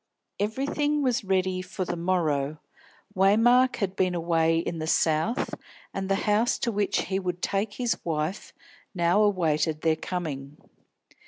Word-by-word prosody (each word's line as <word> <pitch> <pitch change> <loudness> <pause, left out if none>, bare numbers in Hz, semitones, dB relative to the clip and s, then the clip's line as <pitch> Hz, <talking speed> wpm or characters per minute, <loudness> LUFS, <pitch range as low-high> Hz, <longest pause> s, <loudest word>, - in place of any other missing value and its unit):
Everything 285 +7 0
was 250 -4 +1
ready 185 -1 0
for 185 +1 -4
the 175 - -3
morrow. 155 -5 0 0.6
Waymark 230 +7 +4
had 195 -4 -2
been 185 -1 +1
away 165 -1 +2
in 165 0 -2
the 155 - -3
South, 160 - +1 0.4
and 195 0 -3
the 195 - +3
house 215 +3 +2
to 235 - -1
which 205 -1 0
he 190 0 -2
would 180 -2 -3
take 200 +1 -1
his 245 0 -2
wife 160 +3 -3 0.4
now 175 +3 +3
awaited 160 -6 +1
their 160 -1 +2
coming. 150 -5 -5
185 Hz, 145 wpm, -26 LUFS, 165-210 Hz, 0.6 s, Waymark